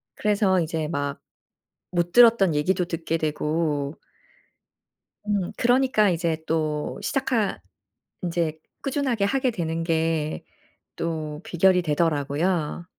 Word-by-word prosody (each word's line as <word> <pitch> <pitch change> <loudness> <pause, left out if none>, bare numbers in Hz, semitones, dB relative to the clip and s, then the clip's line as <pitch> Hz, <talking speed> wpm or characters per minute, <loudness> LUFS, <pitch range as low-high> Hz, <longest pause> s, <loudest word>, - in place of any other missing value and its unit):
그래서 205 -3 +2
이제 160 -1 -2
막 145 -3 -3 0.7
못 175 -1 -1
들었던 230 -7 +6
얘기도 180 +5 +1
듣게 165 -1 -3
되고 150 -1 -1 1.3
음. 200 -4 0
그러니까 245 -4 +3
이제 165 -2 0
또 155 -2 -1
시작하 240 - 0 0.6
인제 165 -3 -1 0.2
꾸준하게 265 -6 0
하게 260 +4 +1
되는 165 -5 -3
게 160 -2 -1 0.5
또 155 -2 -3
비결이 180 +1 +3
되더라고요. 155 +2 0
170 Hz, 220 characters per minute, -24 LUFS, 155-200 Hz, 1.3 s, 들었던